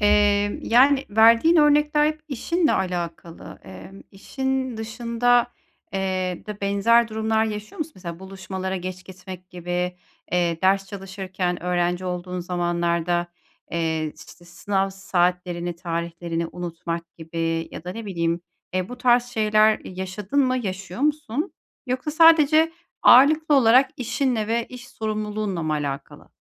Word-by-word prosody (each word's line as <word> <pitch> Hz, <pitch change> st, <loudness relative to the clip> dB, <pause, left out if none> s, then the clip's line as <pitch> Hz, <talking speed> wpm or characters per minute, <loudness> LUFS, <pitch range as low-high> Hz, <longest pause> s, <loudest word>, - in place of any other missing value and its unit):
Emm, 205 Hz, 0 st, +3 dB
yani, 270 Hz, +4 st, +4 dB
verdiğin 230 Hz, +10 st, +5 dB
örnekler 295 Hz, 0 st, +4 dB
hep 310 Hz, 0 st, -2 dB
işinle 320 Hz, +5 st, 0 dB
alakalı. 170 Hz, -2 st, -4 dB
Emm, 95 Hz, -, -11 dB
işin 265 Hz, +4 st, -3 dB
dışında, 235 Hz, +2 st, +1 dB, 0.4 s
eee, 185 Hz, -2 st, -2 dB
de 210 Hz, -1 st, -7 dB
benzer 205 Hz, +4 st, +3 dB
durumlar 220 Hz, 0 st, 0 dB
yaşıyor 215 Hz, -, -6 dB
musun? 315 Hz, 0 st, -4 dB
Mesela, 170 Hz, -3 st, -8 dB
buluşmalara 190 Hz, 0 st, -5 dB
geç 185 Hz, 0 st, -6 dB
gitmek 185 Hz, -1 st, -11 dB
gibi, 180 Hz, 0 st, -3 dB, 0.4 s
eee, 170 Hz, -2 st, +1 dB
ders 195 Hz, +1 st, +3 dB
çalışırken 190 Hz, -2 st, -4 dB
öğrenci 180 Hz, 0 st, 0 dB
olduğun 180 Hz, 0 st, -4 dB
zamanlarda, 175 Hz, -1 st, -1 dB, 0.4 s
eee, 160 Hz, -1 st, -1 dB
ş -, -, -12 dB
işte 175 Hz, -, -15 dB
sınav 190 Hz, +3 st, -1 dB
saatlerini, 180 Hz, -2 st, -1 dB
tarihlerini 170 Hz, -1 st, -3 dB
unutmak 170 Hz, -1 st, -5 dB
gibi 165 Hz, 0 st, -3 dB
ya 160 Hz, -, -9 dB
da 180 Hz, -, -5 dB
ne 225 Hz, +1 st, -7 dB
bileyim, 170 Hz, -2 st, -1 dB, 0.3 s
eee, 185 Hz, 0 st, -1 dB
bu 250 Hz, -, -8 dB
tarz 245 Hz, -1 st, +4 dB
şeyler 215 Hz, -2 st, +3 dB
yaşadın 190 Hz, +7 st, -3 dB
mı, 255 Hz, 0 st, +1 dB
yaşıyor 190 Hz, -2 st, -5 dB
musun? 300 Hz, -, -1 dB, 0.3 s
Yoksa 255 Hz, +4 st, -2 dB
sadece 320 Hz, 0 st, +5 dB, 0.3 s
ağırlıklı 300 Hz, +4 st, +6 dB
olarak 255 Hz, 0 st, +5 dB
işinle 250 Hz, -3 st, -1 dB
ve 230 Hz, +1 st, -1 dB
iş 250 Hz, 0 st, -11 dB
sorumluluğunla 215 Hz, -5 st, -3 dB
mı 155 Hz, -, -1 dB
alakalı? 140 Hz, -2 st, -5 dB
195 Hz, 130 wpm, -23 LUFS, 175-240 Hz, 0.4 s, ağırlıklı